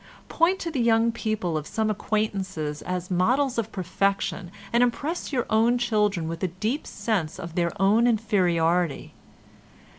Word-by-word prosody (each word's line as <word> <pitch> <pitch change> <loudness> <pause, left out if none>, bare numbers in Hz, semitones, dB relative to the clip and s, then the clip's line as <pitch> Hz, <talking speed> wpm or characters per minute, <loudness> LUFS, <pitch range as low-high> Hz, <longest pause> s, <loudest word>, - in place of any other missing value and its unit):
Point 340 +3 +3
to 335 - -3
the 270 -5 -1
young 230 0 +3
people 215 -7 -2
of 155 -1 -3
some 220 -1 0
acquaintances 195 -8 -2
as 180 0 -4
models 245 +8 +2
of 225 -1 -3
perfection 195 0 -1 0.2
and 235 - +4
impress 280 +9 -1
your 250 -4 0
own 230 +3 +3
children 210 -8 +1
with 165 0 -5
a 185 - +1
deep 215 - -3
sense 195 -9 -2
of 170 -1 -7
their 170 0 0
own 210 +5 +4
inferiority. 180 - +1
210 Hz, 150 wpm, -25 LUFS, 180-235 Hz, 0.2 s, and